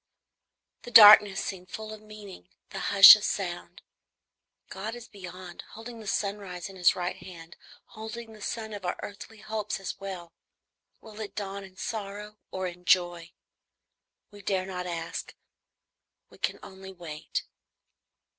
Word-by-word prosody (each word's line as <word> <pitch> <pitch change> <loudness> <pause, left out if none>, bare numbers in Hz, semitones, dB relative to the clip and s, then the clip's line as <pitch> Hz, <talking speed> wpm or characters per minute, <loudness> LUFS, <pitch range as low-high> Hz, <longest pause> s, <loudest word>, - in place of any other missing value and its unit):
The - - -10
darkness 210 -3 +9
seems 185 -2 -7
full 220 0 -7
of 215 - -11
meaning; 210 - -12 0.2
the - - -5
hush, - - +11
of - - -6
sound. - - -4 0.8
God 215 +4 -6
is 240 -1 -11
beyond, 185 -3 -10
holding 230 +1 -9
the 215 - -10
sunrise 200 -3 -3
in 195 - -12
his 180 -2 +4
right 180 0 -3
hand, 170 -2 -12 0.3
holding 220 +1 -8
the 215 - -15
sun 220 0 -5
of 205 -2 -7
our 180 - -2
earthly 205 +1 -10
hopes 215 -1 -4
as 195 - -6
well, 185 -4 -8 0.7
will 215 -1 -13
it 215 -2 -7
dawn 200 -1 -5
in 190 -1 -15
sorrow 210 -1 -6
or 190 0 -4
in 180 0 -7
joy? 175 -2 +2 1.0
We 205 0 -13
dare 190 -1 -1
not 180 -1 -5
ask, 165 -1 -5 1.0
we - - -18
can - - -1
only 190 0 -11
wait. 165 -4 -6
195 Hz, 145 wpm, -28 LUFS, 180-215 Hz, 1.0 s, hush